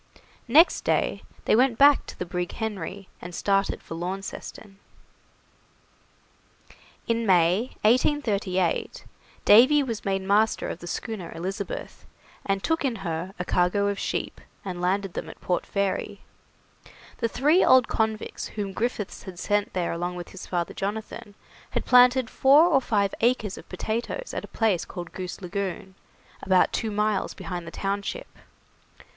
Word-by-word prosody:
Next 310 +9 +5
day - - 0 0.2
they - - +4
went 245 0 +3
back 285 0 +6
to - - -9
the 180 - -4
brig 180 0 -3
'Henry', 205 -3 -5
and 175 0 -8
started 195 -1 0
for - - -8
Launceston. 195 +3 -6 2.3
In 230 0 +1
May, 185 +6 +3
1838, 210 - +1 0.4
Davy 260 +7 +7
was 230 -5 -4
made 195 -1 -1
master 210 +3 +2
of - - -5
the 175 - -9
schooner 215 -3 -5
'Elizabeth', 195 - -5 0.4
and 195 -1 -1
took 325 -1 0
in 260 -4 0
her 170 +4 -4
a 180 - -4
cargo 180 +4 +2
of 200 -1 -3
sheep, - - -3 0.2
and 180 -2 -5
landed 190 +1 0
them - - -5
at - - -12
Port 180 - -2
Fairy. 200 -1 -2 1.0
The 230 - +1
three 300 +10 +3
old 255 -2 +6
convicts 220 -1 -2
whom 200 -2 -5
Griffiths 220 -2 -3
had 185 -2 -10
sent 205 +2 0
there 180 -2 -1
along 175 +1 -3
with 175 -1 -7
his 190 - -10
father 175 -2 -2
Jonathan, 205 0 -5 0.3
had - - -3
planted 250 0 +6
four 275 +6 +5
or 300 -6 +3
five 205 -5 0
acres 225 -4 +1
of - - -13
potatoes 235 - -4
at - - -3
a - - -8
place 210 -7 +1
called 175 -2 -8
Goose 185 0 -7
Lagoon, 190 0 -4 0.5
about 185 -1 +3
two 225 - -1
miles 210 -1 -1
behind 175 -2 -6
the - - -4
township. 200 - -4
200 Hz, 150 wpm, -26 LUFS, 185-230 Hz, 2.3 s, Davy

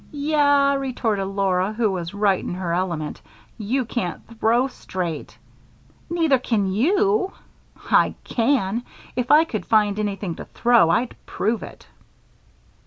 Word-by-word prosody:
"Yah," 285 -1 +3
retorted 240 -7 -1
Laura, 195 0 0
who 220 -2 +1
was 175 0 -4
right 200 -2 +2
in - - -4
her 180 -2 -3
element, 170 -4 -2 0.4
"you 245 +5 -1
can't 190 -7 -3 0.2
throw 235 +3 +3
straight." 180 - -5 0.7
"Neither 325 -6 +2
can 210 -6 0
you." 390 - +2 0.6
"I - - +4
can! 235 -3 0 0.3
If 250 0 -2
I 305 +2 +7
could 220 -10 -4
find 210 -2 +3
anything 200 -4 -2
to - - -7
throw 235 -8 +3
I'd 230 +8 +1
prove 220 +2 -1
it." - - -11
220 Hz, 130 wpm, -22 LUFS, 190-270 Hz, 0.7 s, I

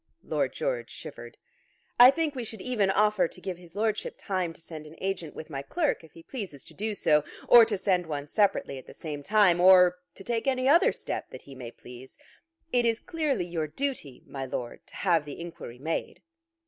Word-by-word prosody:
Lord - - -1
George - - -2
shivered. - - -10 0.6
"I 245 +1 +11
think 310 +1 0
we 255 -3 -4
should 220 -1 -8
even 215 -4 0
offer 210 -1 +3
to 185 - -13
give 185 -1 -5
his 175 0 -15
Lordship 215 0 -1
time 185 -4 -2
to - - -15
send 160 -2 -9
an 155 - -13
agent 185 -5 -3
with 160 - -9
my 135 -1 -3
clerk 300 - -1
if 160 - -16
he 165 - -14
pleases 195 - -7
to - - -12
do 215 +1 -3
so, 150 -5 +3 0.2
or 235 -2 +9
to 215 -3 -1
send 185 -2 +1
one 145 -2 -4
separately 150 -6 +1
at - - -15
the - - -12
same 150 -3 -6
time, 190 0 +4
or 180 -1 +7 0.2
to 195 - -11
take 235 +4 -2
any 260 -1 +1
other 325 +5 +6
step - - -5
that - - -11
he 140 - -12
may 125 -3 -8
please. 125 +2 -13 0.6
It 245 -1 +4
is 230 -1 +1
clearly 310 - -1
your 165 -3 -3
duty, 230 - -4
my 135 -1 -6
Lord, 125 -2 -6
to - - -15
have 170 -5 +2
the 145 -1 -9
inquiry 170 -8 -8
made." 160 +5 -4
185 Hz, 210 wpm, -28 LUFS, 155-225 Hz, 0.6 s, I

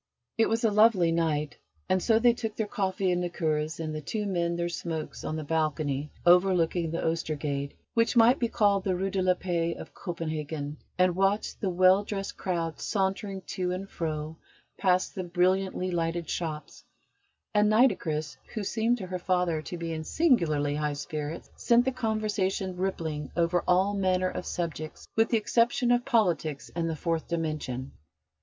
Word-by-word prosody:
It 225 -1 +3
was 225 +2 0
a 225 - +4
lovely 205 -5 +5
night, 155 -3 0 0.3
and 185 0 +2
so 225 +2 +4
they 240 +1 +5
took 225 -3 -4
their 220 - -1
coffee 190 -2 -1
and 180 0 +1
liqueurs, 160 -3 -1
and 155 -1 -3
the 155 - -4
two 210 +8 -3
men 170 -3 0
their 170 0 -1
smokes 165 -2 -5
on 155 - -3
the 155 - -3
balcony 150 -2 -1 0.2
overlooking 175 -2 +4
the 165 - -3
Oestergade, 150 -3 -2 0.2
which 230 +1 +2
might 240 +3 +6
be 235 - +1
called 205 -3 +2
the 190 -2 0
Rue 190 +2 -1
de 190 - 0
la 185 0 +3
Paix 170 -2 -1
of - - -10
Copenhagen, 155 -4 -4 0.2
and 180 -1 +3
watched 195 +2 0
the 195 - 0
well 185 +2 +5
dressed 195 -1 -4
crowds 170 -3 -3
sauntering 195 -1 -1
to 180 +1 -3
and 185 +2 -4
fro 155 -1 -4 0.4
past 185 -1 +1
the 185 - -4
brilliantly 185 +1 +1
lighted 170 -1 -1
shops; 155 -3 -4 0.7
and 210 0 +4
Nitocris, 185 - +2 0.2
who 215 - -2
seemed 230 +4 +1
to 195 - -6
her 185 0 -4
father 180 -3 +1
to 175 - -6
be 165 -1 -4
in 160 0 -4
singularly 155 - +2
high 150 0 -1
spirits, 150 +2 -5
sent 240 +1 +4
the 265 - +2
conversation 210 -6 -1
rippling 165 -5 -3
over 170 +1 +2
all 190 +3 +3
manner 185 -2 +1
of - - -5
subjects 160 -3 -4
with 225 +1 +3
the 230 - +3
exception 235 +3 +2
of 245 0 +2
politics 170 - 0
and 165 -1 -1
the 160 - -2
Fourth 165 +1 -2
Dimension. 155 -6 -3
180 Hz, 175 wpm, -28 LUFS, 160-200 Hz, 0.7 s, might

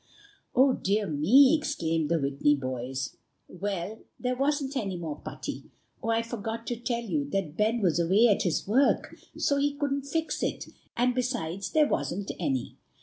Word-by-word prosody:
"Oh, 265 +1 +6
dear 205 0 0
me!" 230 - +6
exclaimed 165 - -1
the 170 - +3
Whitney 140 +1 +2
boys. 130 0 -4 0.3
"Well, 195 +2 -4 0.2
there 250 0 -1
wasn't 280 +1 0
any 195 -8 -2
more 160 -4 -5
putty. - - -6 0.4
Oh! 225 - -3
I 225 0 +2
forgot 230 0 -5
to 240 - -2
tell 235 0 -2
you 155 -10 -2
that 175 -3 -2
Ben 220 +4 +1
was 175 -4 +2
away 190 +8 +5
at 205 - +3
his 175 -1 0
work, 260 +7 +2 0.2
so 280 - +2
he 285 0 +1
couldn't 280 -1 -2
fix 320 +2 -1
it, - - -2 0.3
and 250 +1 +3
besides, 240 -8 -2
there 305 -1 +4
wasn't 195 -4 -2
any." 135 -7 -2
215 Hz, 165 wpm, -28 LUFS, 165-255 Hz, 0.4 s, Oh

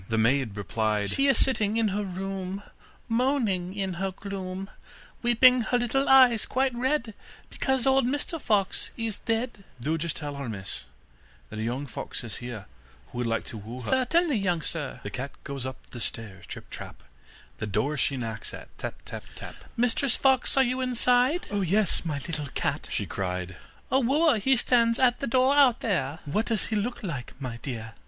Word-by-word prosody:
The 110 - +1
maid 115 -1 +2
replied: 105 0 0
'She 275 +1 +3
is 275 - +4
sitting 220 -5 +2
in 225 -2 +3
her 205 +2 -1
room, 195 +1 -4 0.4
Moaning 225 -7 +1
in 195 -2 -2
her 195 - +1
gloom, 190 0 -5 0.5
Weeping 250 +1 +6
her 245 - +4
little 245 +3 +1
eyes 255 -4 +7
quite 265 0 +1
red, 245 -2 0 0.4
Because 265 -2 0
old 265 -2 +4
Mr 290 +4 -2
Fox 205 -3 +1
is 225 -3 -2
dead.' 230 -2 -2 0.2
'Do 155 +7 -1
just 165 0 -2
tell 145 -2 -5
her, 140 -4 -4
miss, 100 -3 -5 0.7
that 110 - -5
a - - -1
young 125 +5 -2
fox 125 - -6
is 115 - -6
here, 120 -4 -6 0.5
who 120 - -5
would 120 - 0
like 115 0 0
to 110 - -8
woo 115 +5 -7
her.' - - -3
'Certainly, 285 +3 +3
young 180 -5 0
sir.' 150 -5 -4
The 105 - -5
cat 130 +6 -5
goes 140 -3 -4
up 130 - -6
the 120 - -7
stairs 105 -4 -4
trip, - - -9
trap, - - -8 0.6
The 110 - -3
door 110 +9 0
she 140 -1 +1
knocks 110 -3 -5
at - - -12
tap, - - -4
tap, - - -7
tap, - - -8 0.2
'Mistress 245 +2 +3
Fox, 265 0 +3
are 270 - +7
you 255 +1 0
inside?' 250 +5 +3
'Oh, 205 -1 0
yes, 195 +2 +2
my 160 -4 -2
little 150 0 -4
cat,' - - -1
she - - 0
cried. 90 -1 -3 0.4
'A 265 - +5
wooer 275 0 +3
he 265 +6 +4
stands 235 -1 +4
at 250 -2 +3
the 275 - -2
door 260 +3 +4
out 270 -5 +5
there.' 160 - 0
'What 210 +10 0
does 225 -4 0
he - - +2
look 220 +4 -2
like, 145 -11 -5
my 125 -4 -5
dear? 115 -4 -5
195 Hz, 190 wpm, -27 LUFS, -, 0.7 s, eyes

